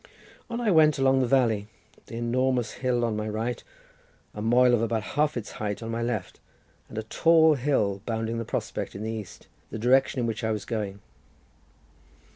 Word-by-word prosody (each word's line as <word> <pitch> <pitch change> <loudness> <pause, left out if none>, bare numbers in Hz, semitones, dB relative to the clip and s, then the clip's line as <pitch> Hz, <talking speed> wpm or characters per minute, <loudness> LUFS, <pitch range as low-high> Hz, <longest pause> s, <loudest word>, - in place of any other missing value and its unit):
On 235 0 -3
I 230 -4 +1
went 155 -3 +5
along 135 0 +3
the 130 - +1
valley, 115 -5 +2 0.4
the - - -8
enormous 120 0 0
hill 125 -2 0
on 115 -2 -1
my 105 0 -3
right, 115 +3 -3 0.7
a 105 - -6
moel 120 +3 +4
of 120 - +3
about 115 -1 0
half 150 -1 +1
its 110 - -5
height 105 +1 -4
on 115 - -4
my 115 +1 -2
left, 115 -6 -3 0.5
and 110 - -9
a 110 - -2
tall 160 +7 +4
hill 120 -8 0
bounding 115 0 -2
the - - -2
prospect - - -4
in 100 - -5
the 110 - -2
east, 110 -4 -8 0.2
the - - -5
direction 130 +4 +3
in 120 - 0
which 115 -1 -3
I 110 - 0
was 105 -1 -3
going. 100 -4 -4
115 Hz, 190 wpm, -26 LUFS, 110-130 Hz, 0.7 s, went